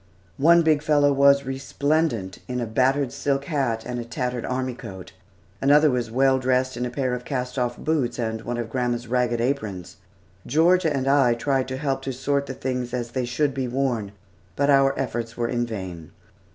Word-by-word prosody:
One 170 +4 +6
big 155 -2 +3
fellow 145 -2 +3
was 140 0 +5
resplendent 135 - -1
in 125 0 -3
a 120 - -1
battered 130 +4 +1
silk 140 -1 -1
hat 130 -8 -1
and 125 0 -4
a - - -3
tattered 125 +1 -3
army 130 0 -2
coat; 95 -6 -9 0.5
another 145 +2 +5
was 120 -2 -1
well 130 +2 +3
dressed 130 0 +1
in 125 +1 -2
a - - -4
pair 130 0 -1
of 125 0 -4
cast 125 -1 -3
off 120 -1 -1
boots 155 -6 -1
and 110 -2 -2
one 120 +1 -4
of 120 -1 -3
grandma's 120 -1 -1
ragged 120 -1 0
aprons. 100 -8 -3 0.5
Georgia 170 +2 +3
and 135 -2 -1
I 135 -4 +4
tried 130 +2 0
to 130 0 -4
help 135 -1 -1
to 135 0 -4
sort 140 +2 -1
the - - -5
things 125 -1 -3
as 120 -1 -4
they 130 0 -1
should 135 +4 0
be 130 -1 -2
worn, 120 -5 -1 0.4
but 140 +1 +2
our 135 0 +4
efforts 115 -1 -3
were 120 -1 0
in 120 -1 -1
vain. 90 -8 -7
130 Hz, 190 wpm, -24 LUFS, 120-140 Hz, 0.5 s, One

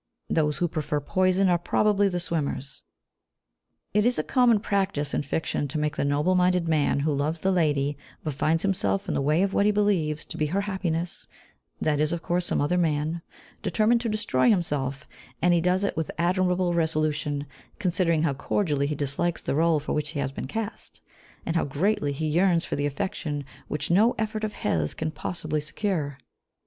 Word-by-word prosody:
Those 150 -2 +2
who 175 - +1
prefer 150 -2 -2
poison 185 +5 +2
are 175 -1 +3
probably 205 +2 +2
the 180 -1 -2
swimmers. 145 -5 -3 1.1
It 210 +1 +4
is 245 +2 +2
a - - 0
common 245 -4 +4
practice 190 -9 -1
in - - +1
fiction 145 0 -2
to 140 - -4
make 150 0 -1
the - - -1
noble 145 +5 +2
minded 180 -1 +2
man 150 -3 +2
who 150 +1 +1
loves 150 +3 -1
the 190 - +2
lady, 145 -5 +1 0.2
but 155 - -2
finds 160 +4 +1
himself 195 0 0
in - - -1
the - - 0
way 155 +6 +3
of 195 0 0
what 200 - +3
he - - +5
believes 190 -8 +1
to - - -8
be 155 - +1
her 190 +6 0
happiness 180 -4 -3 0.5
(that 150 -2 +1
is, 155 0 +2
of 170 -1 -3
course, 175 0 0
some - - 0
other 180 +5 +1
man), 160 0 0 0.4
determine 215 +5 +2
to 235 0 -2
destroy 210 - +2
himself; 145 - 0 0.3
and 175 +1 +3
he 170 - +3
does 180 +3 +2
it 200 - 0
with 160 -1 -2
admirable 180 +1 +1
resolution, 155 -3 0 0.3
considering 175 -5 +1
how 155 -4 +2
cordially 145 -1 0
he 150 - -2
dislikes 145 +5 -1
the - - -1
rôle 160 +1 +3
for 145 - -3
which 150 -1 -1
he 155 -2 -4
has 135 - -1
been 135 - -5
cast, 225 +7 -5 0.4
and 165 - -2
how 165 - +3
greatly 145 +2 0
he 150 +3 -3
yearns 170 +2 +2
for - - -3
the 145 0 0
affection 145 -3 -3 0.2
which 150 - -3
no 215 +7 +4
effort 220 0 -2
of 215 -1 -2
his 80 -3 -1
can 160 0 -2
possibly 155 -1 -3
secure. 155 -3 -2
165 Hz, 195 wpm, -26 LUFS, 150-190 Hz, 1.1 s, he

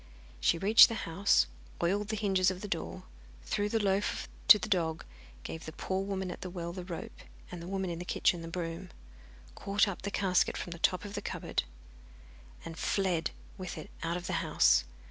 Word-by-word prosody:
She 65 - +3
reached 205 +6 +8
the 230 - -3
house, 190 +5 +3 0.4
oiled 200 +4 +1
the 215 - -2
hinges 195 -3 +2
of 185 0 -5
the 210 - -5
door, 85 - -4 0.4
threw 205 - -1
the 225 - +1
loaf 200 -1 0 0.2
to - - +11
the 215 - -4
dog, 165 -5 0 0.4
gave 160 - -7
the - - -5
poor 190 +4 -2
woman 190 -2 -3
at - - -8
the 185 - -5
well 170 -1 -5
the 185 0 -6
rope, 175 -2 -7 0.3
and 175 -2 -7
the 170 - -8
woman 190 -1 -2
in 170 - -5
the - - -4
kitchen 175 -1 +1
the 165 - -7
broom, 170 +1 -5 0.6
caught 200 +1 +1
up 195 - -4
the 200 - -3
casket 190 -3 +1
from 175 - -5
the 170 - -7
top 185 +3 +1
of 205 - -7
the - - -3
cupboard, - - -2 1.0
and 165 -1 -7
fled 185 -5 0 0.3
with 185 -2 -5
it 155 - -9
out 165 +2 -1
of 180 - -7
the - - -3
house. 60 0 +4
185 Hz, 205 wpm, -31 LUFS, 165-200 Hz, 1.0 s, to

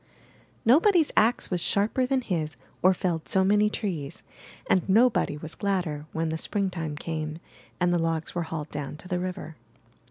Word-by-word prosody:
Nobody's 325 - +5
ax 230 0 +3
was 180 -2 0
sharper 220 +8 +1
than 265 0 +1
his 160 - -2 0.3
or 185 - +6
felled 175 -3 -2
so 190 - +2
many 210 +2 +4
trees, 175 -11 -4 0.4
and 185 - +4
nobody 225 -7 +3
was 155 +1 -7
gladder 175 -7 -2
when 160 0 -1
Spring 200 0 -1
time 160 -4 -4
came 155 0 -4 0.4
and 175 -1 +2
the 175 - +2
logs 165 -1 -1
were 175 - -1
hauled 155 -2 -5
down 145 0 -5
to 180 - -11
the 180 -1 -1
river. 180 -3 -5
180 Hz, 165 wpm, -27 LUFS, 160-205 Hz, 0.4 s, or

